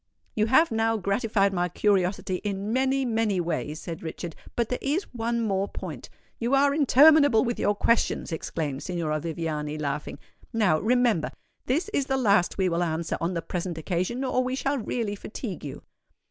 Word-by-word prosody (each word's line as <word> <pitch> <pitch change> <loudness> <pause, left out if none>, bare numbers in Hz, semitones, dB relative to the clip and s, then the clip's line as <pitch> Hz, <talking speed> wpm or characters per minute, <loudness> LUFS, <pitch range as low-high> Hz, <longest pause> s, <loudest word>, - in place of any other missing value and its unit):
"You 215 0 +1
have 265 +6 +4
now 225 0 +1
gratified 200 0 +1
my 180 -1 0
curiosity 190 -1 +1
in 200 +2 -3
many—many 245 -6 +1
ways," 160 -2 -2
said 165 -1 -7
Richard; 165 0 -6 0.2
"but 235 -2 0
there 250 - -2
is 300 +8 0
one 235 0 -1
more 195 -3 0
point——" - - -7 0.3
"You 240 +4 +1
are 280 +1 +4
interminable 285 -3 +6
with 240 0 -2
your 205 - +2
questions," 230 -3 +1
exclaimed 150 -3 -3
Signora 165 -4 -2
Viviani, 155 -2 -3
laughing. 145 -1 -3 0.3
"Now, 205 -9 +2
remember—this 245 - 0
is 280 -10 -1
the 270 - +1
last 205 -7 +3
we 190 -1 +2
will 170 -1 0
answer 165 -1 -1
on 175 +2 -1
the 165 - -2
present 175 0 -4
occasion, 185 - -2
or 255 -1 +1
we 255 +1 -2
shall 275 +1 -1
really 225 -2 -2
fatigue 205 - -6
you." 145 - -7
205 Hz, 165 wpm, -26 LUFS, 170-245 Hz, 0.3 s, interminable